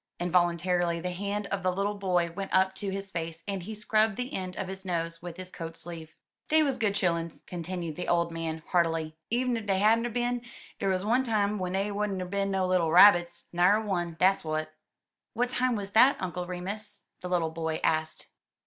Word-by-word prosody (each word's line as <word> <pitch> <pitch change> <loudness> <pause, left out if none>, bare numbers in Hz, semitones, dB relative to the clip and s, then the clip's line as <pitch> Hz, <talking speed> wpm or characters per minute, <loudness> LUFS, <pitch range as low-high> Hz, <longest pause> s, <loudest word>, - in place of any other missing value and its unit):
Involuntarily 175 0 +1
the 180 +2 -3
hand 200 +3 -3
of 200 -1 -1
the 185 0 +1
little 200 +3 -1
boy 180 -4 0
went 195 +3 -5
up 190 0 +4
to 195 +1 -4
his 195 0 -5
face, 165 -1 -5
and 195 -2 -2
he 215 +5 -6
scrubbed 215 0 +1
the 250 +1 -4
end 185 -1 -4
of 190 - -4
his 190 0 -7
nose 165 -2 -3
with 175 0 -8
his 185 0 -8
coat 165 -1 -7
sleeve. 165 -2 -8 0.3
"Dey 315 0 +5
wuz 275 -3 0
good 210 -3 +1
chilluns," 170 -4 -1
continued 170 -2 -5
the 180 - -4
old 170 -1 +2
man 160 -1 -4
heartily, 165 -3 +1 0.2
"en 245 +1 +1
ef 225 -2 -5
dey 195 -1 +2
hadn't 225 +4 +4
er - - -4
bin, 245 +1 -1 0.4
der 195 - +1
wuz 185 +1 -1
one 240 +4 +3
time 210 -3 +1
w'en 180 0 -2
dey 195 +2 0
wouldn't 200 -1 -1
er 185 - -3
bin 200 +2 -1
no 190 -1 +1
little 180 -3 +2
rabbits 175 -1 +6
— - - -37
na'er 180 +5 +4
one. 175 -6 -2
Dat's 190 +1 +4
w'at." 155 0 -3 0.6
"What 245 +1 0
time 255 -1 +1
was 200 -2 -4
that. 250 +6 +6
Uncle 180 -1 -4
Remus?" 195 +4 -5 0.2
the 180 - -5
little 170 -3 +1
boy 160 -1 -2
asked. 155 0 -1
185 Hz, 210 wpm, -28 LUFS, 170-205 Hz, 0.6 s, rabbits